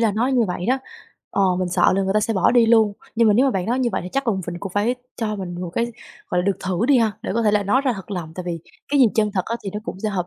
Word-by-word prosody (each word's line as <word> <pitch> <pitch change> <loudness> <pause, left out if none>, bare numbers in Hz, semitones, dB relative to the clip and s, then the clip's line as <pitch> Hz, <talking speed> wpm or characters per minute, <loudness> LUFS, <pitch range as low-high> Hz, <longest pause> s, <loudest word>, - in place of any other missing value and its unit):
là 225 -3 +2
nói 245 +6 0
như 240 -3 +3
vậy 180 +1 -4
đó, 260 +2 +2 0.5
ờ, 200 - +1 0.2
mình 185 -1 -1
sợ 175 - +3
là 195 - +2
người 195 +1 -1
ta 215 - +4
sẽ 225 +1 -1
bỏ 190 - +3
đi 240 -2 +5
luôn, 220 -3 +4 0.2
nhưng 230 -1 +4
mà 205 - +4
nếu 260 +4 +4
mà - - +3
bạn 190 -6 -2
nói 245 +3 0
như 255 - +1
vậy - - -1
thì - - -5
chắc 275 0 0
cùng 205 -5 0 0.2
cũng 195 -2 -6
phải 215 +5 +1 0.2
cho 215 -3 -2
mình 180 -3 -5
một 175 -2 -4
cái, 235 - 0 0.4
gọi 180 - 0
là, - - -1
được 200 - +1
thử 185 +5 0
đi 275 -3 +5
ha, 220 -2 +2
để - - -4
có 230 - +1
thể 210 - +3
là 205 0 +2
nói 210 +7 +2
ra 255 - +2
thật 195 0 -9
lòng, 170 -4 -5
tại 180 - -5
vì 170 -1 -3 0.3
cái 285 -1 +2
gì 255 - +8
chân 210 -2 +2
thật 185 -3 0
á 230 - -3
thì 195 - -3
nó 210 - -4
cũng 190 - -6
sẽ 215 - -1
hợp 185 -4 -2
210 Hz, 340 wpm, -22 LUFS, 190-235 Hz, 0.5 s, gì